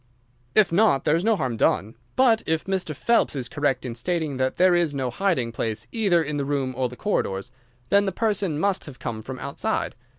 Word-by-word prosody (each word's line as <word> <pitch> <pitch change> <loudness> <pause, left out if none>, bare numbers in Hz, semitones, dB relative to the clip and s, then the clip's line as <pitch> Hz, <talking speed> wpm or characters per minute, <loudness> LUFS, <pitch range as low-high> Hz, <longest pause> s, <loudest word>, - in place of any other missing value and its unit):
"If 215 -5 +5
not, 185 -6 +3
there 150 - +3
is 170 - 0
no 225 +1 +3
harm 125 - -2
done. 105 +1 +1 0.2
But 240 -4 +4
if 160 0 0
Mr. 190 -5 -2
Phelps 235 -5 +2
is 130 -3 -3
correct 135 -1 -1
in 120 - -4
stating 155 +2 -2
that 130 0 -1
there 185 0 +5
is 170 -4 +1
no 130 -2 -1
hiding 140 -10 0
place 110 -1 -3
either 195 -7 +2
in 150 -1 -3
the 140 - -1
room 135 -2 -1
or 130 0 0
the 125 - -10
corridors, 110 - -2 0.4
then 200 0 +4
the 195 - 0
person 195 -6 -1
must 195 +1 0
have 145 -5 -10
come 110 -2 -5
from 130 +4 -7
outside. 140 +1 -2
150 Hz, 210 wpm, -24 LUFS, 130-190 Hz, 0.4 s, If